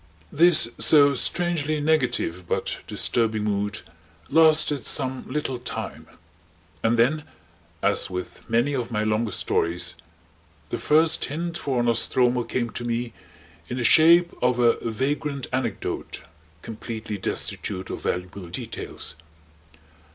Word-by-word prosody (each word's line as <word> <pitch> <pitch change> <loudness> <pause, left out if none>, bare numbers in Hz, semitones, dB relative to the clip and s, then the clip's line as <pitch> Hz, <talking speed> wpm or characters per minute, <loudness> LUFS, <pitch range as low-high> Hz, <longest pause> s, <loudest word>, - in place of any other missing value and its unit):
This 165 -5 +5
so 145 -2 +6
strangely 155 +1 0
negative 130 - 0
but - - -1
disturbing 110 -2 0
mood 105 0 -2 0.5
lasted 155 -3 +4
some 130 -3 0
little 135 -3 -2
time; 125 - -6 0.7
and 115 +1 +2
then, 140 +7 +2 0.6
as - - +2
with 90 -1 -6
many 120 +5 +2
of 125 -4 -2
my 105 -3 -1
longer 110 +1 0
stories, 85 +1 -1 0.8
the - - -3
first 160 +2 +3
hint 170 +3 -4
for 130 -7 -1
"Nostromo" 120 +1 +2
came 120 0 -2
to - - -5
me 120 -1 -3 0.6
in 125 - -4
the 125 - -2
shape 170 +7 +6
of 125 0 +2
a 120 -1 +3
vagrant 140 +3 -2
anecdote 130 0 -3 0.4
completely 110 -2 -6
destitute 95 0 -3
of - - -5
valuable 90 +1 -4
details. 80 - -5
125 Hz, 120 wpm, -24 LUFS, 110-150 Hz, 0.8 s, so